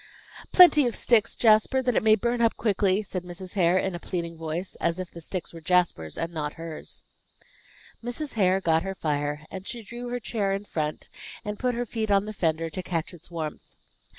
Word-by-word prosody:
"Plenty 305 -7 +8
of 235 - -2
sticks, 230 -4 +3
Jasper, 225 +4 +4
that 250 -2 +1
it - - +3
may 215 0 +6
burn 235 +3 -1
up 230 -1 +3
quickly," 200 -2 +2
said 185 -2 -4
Mrs. 180 +1 -8
Hare, 180 -2 +3
in 190 0 0
a 175 - -5
pleading 170 -2 -4
voice, 165 +3 -4
as 170 0 +1
if 185 -1 -5
the 170 - -10
sticks 180 +2 -5
were 165 - -9
Jasper's 165 - +1
and 165 +1 -3
not 150 -2 -3
hers. 165 -1 -7 1.0
Mrs. 245 +4 -3
Hare 190 -3 +3
got 160 -2 +3
her 195 +2 -4
fire, 150 -2 -2
and 190 0 -7
she 235 -2 -6
drew 240 +4 -7
her 245 0 -2
chair 210 -4 -1
in 200 +1 -3
front, 155 -5 -3 0.4
and 210 0 -4
put 250 -1 0
her 245 +1 -1
feet 220 -1 -3
on 200 0 +3
the 215 - -5
fender, 165 -3 -1
to 185 - -4
catch 170 -1 -3
its 175 0 -12
warmth. 160 -3 -6
185 Hz, 205 wpm, -26 LUFS, 165-220 Hz, 1.0 s, Plenty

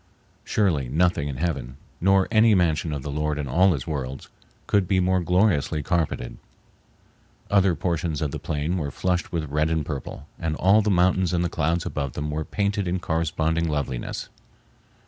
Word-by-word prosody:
Surely 80 - +1
nothing 85 0 +1
in 70 -3 -5
heaven, 70 -6 -3 0.2
nor 95 +1 +4
any 110 -1 +5
mansion 80 -3 +1
of 70 -3 -4
the 75 - -4
Lord 75 +1 -1
in 75 -2 -3
all 90 +8 +4
his 70 -6 -4
worlds, 70 -4 -5 0.4
could 100 -3 +2
be 95 +1 +2
more 95 0 +2
gloriously 90 -4 +1
carpeted. 80 -7 -1 1.1
Other 95 -3 +4
portions 85 -3 -1
of 75 -3 -2
the - - -4
plain 75 +5 -2
were 75 -3 -2
flushed 90 +4 -1
with 80 -4 -3
red 75 +2 +1
and 80 -2 0
purple, 70 -4 -6
and 80 -1 -2
all 100 +6 +4
the 105 - 0
mountains 90 -1 +2
and 85 0 +1
the - - -1
clouds 85 +2 0
above 70 -3 -3
them 75 0 -3
were 75 +1 -2
painted 100 +1 -1
in 90 +1 0
corresponding 80 -1 0
loveliness. 70 -5 -3
80 Hz, 175 wpm, -24 LUFS, 75-90 Hz, 1.1 s, any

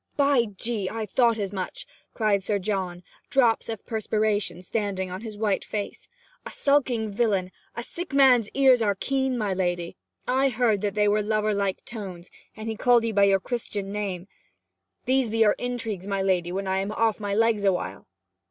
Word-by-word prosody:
'By 280 -4 +4
G 210 -2 -2
I 225 -1 -3
thought 235 +2 +2
as 200 -2 -3
much!' 185 -2 -5 0.3
cried 210 -3 +2
Sir 205 +2 0
John, 185 -3 -3 0.3
drops 240 -5 +2
of 225 -3 -5
perspiration 215 -4 -1
standing 190 -2 -2
on 185 +2 -5
his 220 -2 -7
white 205 -2 0
face. 205 -1 -5 0.4
'A - - -7
skulking 250 -6 +1
villain! 200 -4 0 0.2
A 235 - -4
sick 345 +7 -6
man's 260 -6 +5
ears 265 -3 +5
are 205 -2 +2
keen, 265 +4 -1
my 210 -4 0
lady. 175 -2 -2 0.3
I 265 +2 +3
heard 225 -4 +1
that 205 -1 -2
they 210 0 +3
were 210 +1 +3
lover 215 0 0
like 200 -2 -2
tones, 190 -6 -8 0.3
and 215 +1 -6
he 220 - -2
called 240 0 +4
'ee 230 - 0
by 200 -1 +4
your 195 -1 +4
Christian 205 -2 -4
name. 195 -3 -4 0.8
These 260 -2 +2
be 225 - -2
your 220 -2 +5
intrigues, 225 -6 -3
my 195 -1 -1
lady, 180 -2 +1
when 195 +2 -3
I 190 0 0
am 195 +2 -1
off 225 0 +1
my 205 -1 -2
legs 225 -1 +2
awhile!' 180 - -1
210 Hz, 185 wpm, -26 LUFS, 195-230 Hz, 0.8 s, man's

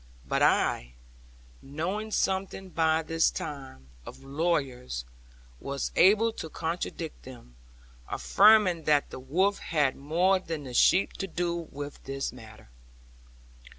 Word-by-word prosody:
But - - 0
I, - - +2 0.7
knowing 180 +10 -4
something 190 -2 -1
by 160 -1 +1
this 165 +1 +2
time, 135 - -7
of 135 - -11
lawyers, 135 - -2 0.5
was 140 0 -4
able 215 +5 +5
to 160 - -7
contradict 165 0 -4
them; 120 - -13 0.5
affirming 200 -6 +4
that 150 -2 +2
the - - -7
wolf 185 +10 +1
had 145 -5 0
more 175 +7 +2
than 165 -4 -5
the 130 -2 -8
sheep 185 +9 +4
to 195 - -2
do 170 -1 -2
with 145 +1 -8
this 135 -1 -4
matter. 110 - -14
160 Hz, 120 wpm, -28 LUFS, 135-185 Hz, 0.7 s, able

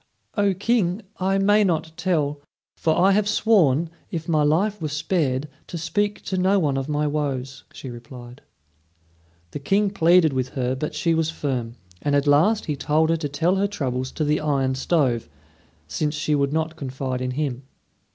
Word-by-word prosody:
"O 200 -2 +2
King! 205 -1 0 0.2
I 190 +1 +1
may 205 +2 +4
not 160 -4 0
tell; 150 -6 -1 0.3
for 160 -1 +1
I 190 +2 +5
have 205 +1 +2
sworn, 170 - +3 0.2
if 165 -2 -5
my 155 -3 +2
life 180 +7 +1
were 155 - -1
spared, 150 -3 -1 0.2
to 175 - -6
speak 205 +6 -1
to 185 - -2
no 190 +2 +3
one 150 -7 +1
of 135 +2 -3
my 150 0 0
woes," 135 -3 -3
she 130 - -8
replied. 120 +1 -11 1.1
The - - -5
King 195 +7 +1
pleaded 170 -4 +4
with 130 -1 -1
her, 125 0 0
but 140 +4 -4
she 165 - +1
was 160 -1 +1
firm; 125 -7 -3 0.3
and 145 -1 +1
at 140 0 +2
last 165 +10 +3
he 150 - -2
told 150 +4 +1
her 165 - +2
to 150 -2 -3
tell 165 +7 +1
her 200 +1 +2
troubles 130 -9 -3
to 155 - -2
the 150 0 +1
iron 140 -3 0
stove, 130 - 0 0.6
since 150 0 -2
she 155 0 -1
would 140 -1 +1
not 160 +1 -1
confide 130 -2 -4
in 130 - -2
him. 135 -4 -2
155 Hz, 180 wpm, -23 LUFS, 135-180 Hz, 1.1 s, I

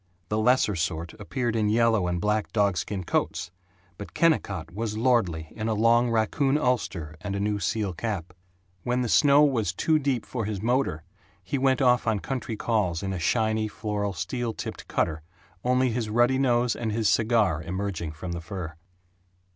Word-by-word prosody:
The 105 - 0
lesser 115 -3 +3
sort 85 0 -2
appeared 120 +2 -2
in 105 -2 +1
yellow 110 -4 +3
and 90 0 -1
black 105 +3 0
dogskin 100 -2 0
coats, 85 - -1 0.5
but 105 - -9
Kennicott 95 - +1
was 110 +1 -3
lordly 95 -10 +1
in 110 0 -3
a 110 - 0
long 115 +3 +4
raccoon 115 +5 +1
ulster 95 - -1
and 100 -1 -4
a - - -2
new 105 0 0
seal 105 -2 -1
cap. 90 -3 -4 0.5
When 125 +4 0
the - - -1
snow 145 +4 +5
was 120 - +2
too 155 - +2
deep 135 -5 -1
for 115 -4 -3
his 105 -2 -3
motor 120 - 0 0.4
he 135 +9 -2
went 135 0 +2
off 125 -2 +3
on 110 -2 +2
country 125 -1 -4
calls 100 -9 0
in 95 0 -2
a 90 - -3
shiny, 110 +4 +1
floral, 105 -1 -3
steel 115 +7 -3
tipped - - -7
cutter, 80 0 -1 0.4
only 125 0 +2
his 115 -1 -2
ruddy 120 +4 +3
nose 120 -2 +2
and 115 -2 -3
his 110 0 0
cigar 110 -9 +2
emerging 90 -2 -4
from 85 +3 -6
the 85 0 -4
fur. 85 -2 -6
110 Hz, 175 wpm, -26 LUFS, 95-120 Hz, 0.5 s, snow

